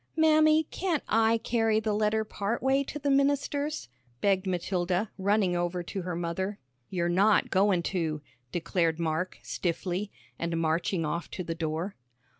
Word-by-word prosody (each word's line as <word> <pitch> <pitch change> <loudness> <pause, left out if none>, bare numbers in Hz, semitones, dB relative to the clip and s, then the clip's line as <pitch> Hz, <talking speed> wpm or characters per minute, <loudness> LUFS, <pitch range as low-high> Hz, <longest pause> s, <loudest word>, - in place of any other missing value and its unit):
"Mammy, 310 0 +5
can't 350 -6 -1
I 225 +1 +3
carry 225 -1 +1
the 220 -1 -1
letter 215 +1 +1
part 215 +2 -3
way 270 +1 +3
to 295 - -5
the 285 -1 0
minister's?" 285 +2 +1 0.3
begged 195 +3 +2
Matilda, 180 +2 -1
running 195 -2 +2
over 175 0 -1
to 190 +3 -4
her 180 -1 -4
mother. 175 +4 -2 0.3
"You're 175 -2 0
not 195 +5 +3
goin' 190 -2 +3
to," 160 -5 -2 0.3
declared 165 -1 0
Mark, 165 +2 -1
stiffly, 180 +3 -2 0.3
and 170 0 -1
marching 165 +1 0
off 170 +3 -3
to 180 - -5
the 165 - -3
door. 165 +4 -3
190 Hz, 150 wpm, -29 LUFS, 170-225 Hz, 0.3 s, Mammy